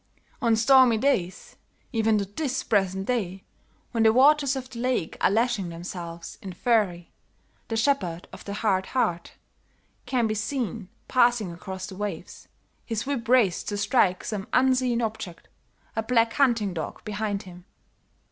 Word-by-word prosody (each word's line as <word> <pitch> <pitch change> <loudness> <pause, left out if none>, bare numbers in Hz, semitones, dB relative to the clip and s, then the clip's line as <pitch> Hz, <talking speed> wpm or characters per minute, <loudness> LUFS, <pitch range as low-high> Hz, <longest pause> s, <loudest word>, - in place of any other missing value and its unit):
"On 230 -3 +3
stormy 245 0 +5
days, 195 -8 -1 0.4
even 220 -1 +2
to 200 - -1
this 260 +7 -3
present 190 -2 0
day, 195 -6 -2 0.5
when 230 - 0
the 220 0 +6
waters 280 +3 +4
of 260 -1 -5
the 240 -2 -9
lake 250 -9 -1
are - - +5
lashing 220 -3 +1
themselves 170 0 -7
in 190 -3 -7
fury, 185 -5 0 0.6
the 225 - -2
shepherd 205 -10 0
of - - -10
the 200 - -5
hard 195 -3 0
heart 175 -9 0 0.7
can 245 -2 +1
be 215 - 0
seen 220 -2 -3 0.2
passing 240 -6 +3
across 185 +2 -7
the 190 - -9
waves, 205 +1 -6 0.4
his 225 -2 -3
whip 270 -5 -3
raised 225 -8 +3
to 205 - -3
strike 200 -4 +2
some 205 -3 -4
unseen 255 -2 +3
object, 215 -6 -5 0.5
a 225 - +1
black 230 0 +2
hunting 230 -8 +2
dog 160 -3 -6
behind 205 -1 -2
him. 180 -1 -13
220 Hz, 150 wpm, -26 LUFS, 190-245 Hz, 0.7 s, the